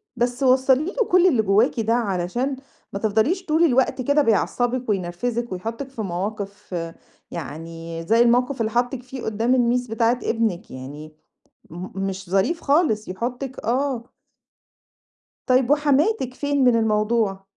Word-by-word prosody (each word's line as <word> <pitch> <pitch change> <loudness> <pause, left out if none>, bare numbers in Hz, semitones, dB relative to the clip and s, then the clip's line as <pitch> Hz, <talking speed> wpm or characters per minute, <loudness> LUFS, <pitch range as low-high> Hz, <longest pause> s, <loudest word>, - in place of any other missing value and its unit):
بس 245 +2 -1
وصَّلي 260 +2 +4
له 480 - +1
كل 365 0 +6
اللي 255 -11 +3
جواكِ 215 +5 +2
ده 225 +1 +1
علشان 235 +4 -1 0.4
ما 200 - -3
تفضليش 225 - +1
طول 315 +1 +2
الوقت 260 -3 +2
كده 285 +4 +3
بيعصبِك 245 +1 0
وينرفزِك 210 +5 -2
ويحطِك 225 +8 -5
في 260 -4 -6
مواقف، 200 +1 -5 0.6
يعني 165 0 -7
زي 225 +2 +4
الموقف 245 +2 +3
اللي 220 0 0
حاطِك 245 +2 -1
فيه 260 0 -8
قدام 225 +3 0
الMiss 245 0 +1
بتاعة 230 +2 +2
ابنِك 225 -6 -1
يعني 145 +4 -9 0.6
م 175 +3 -7 0.2
مش 190 -1 -7
ظريف 195 - +1
خالص 280 -8 +1
يحطِك 245 +7 -4
آه. 255 0 0 1.4
طيب 255 -1 +3
وحماتِك 290 - +2
فين 285 0 0
من 245 -2 +5
الموضوع؟ 215 -3 +1
235 Hz, 135 wpm, -23 LUFS, 200-260 Hz, 1.4 s, كل